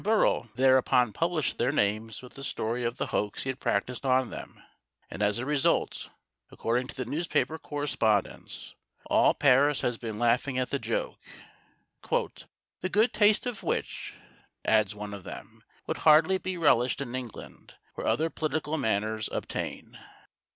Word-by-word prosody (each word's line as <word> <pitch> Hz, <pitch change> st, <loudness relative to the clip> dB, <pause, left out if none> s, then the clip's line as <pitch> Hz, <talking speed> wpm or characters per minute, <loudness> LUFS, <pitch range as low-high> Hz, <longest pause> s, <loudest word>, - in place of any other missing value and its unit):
Bérault 210 Hz, -, +2 dB
thereupon 130 Hz, -3 st, +4 dB
published 165 Hz, -2 st, 0 dB
their -, -, +2 dB
names 110 Hz, +3 st, -1 dB
with 125 Hz, -, -12 dB
the 135 Hz, -, -8 dB
story 120 Hz, -2 st, -2 dB
of 120 Hz, 0 st, -2 dB
the -, -, -1 dB
hoax 105 Hz, 0 st, -1 dB
he 130 Hz, -, -4 dB
had 130 Hz, -, -11 dB
practised 125 Hz, +6 st, -1 dB
on 130 Hz, -2 st, +2 dB
them, -, -, -9 dB, 0.5 s
and -, -, -6 dB
as 105 Hz, 0 st, +2 dB
a 120 Hz, -, -2 dB
result, 145 Hz, -1 st, +1 dB, 0.4 s
according 125 Hz, +2 st, -1 dB
to -, -, -9 dB
the 130 Hz, -2 st, -3 dB
newspaper 160 Hz, +3 st, -1 dB
correspondents, 120 Hz, -8 st, -1 dB, 0.3 s
all -, -, +4 dB
Paris 140 Hz, +1 st, +4 dB
has 120 Hz, -2 st, -1 dB
been 110 Hz, -3 st, -5 dB
laughing 120 Hz, +3 st, +1 dB
at 130 Hz, 0 st, -1 dB
the 140 Hz, -, 0 dB
joke, -, -, -3 dB, 0.9 s
"the 185 Hz, -, -4 dB
good 215 Hz, +5 st, +3 dB
taste 210 Hz, +2 st, +4 dB
of 245 Hz, -5 st, -4 dB
which," -, -, -3 dB, 0.5 s
adds 110 Hz, -2 st, +3 dB
one 105 Hz, 0 st, -6 dB
of 100 Hz, -2 st, -8 dB
them, -, -, -10 dB, 0.2 s
"would -, -, -3 dB
hardly 160 Hz, +5 st, +5 dB
be 185 Hz, -1 st, -4 dB
relished 130 Hz, -6 st, +3 dB
in 130 Hz, -3 st, -5 dB
England, 125 Hz, -3 st, -8 dB, 0.2 s
where -, -, -5 dB
other 160 Hz, +1 st, +1 dB
political 155 Hz, 0 st, -2 dB
manners 110 Hz, -1 st, -1 dB
obtain." -, -, -5 dB
130 Hz, 155 wpm, -28 LUFS, 115-155 Hz, 0.9 s, hardly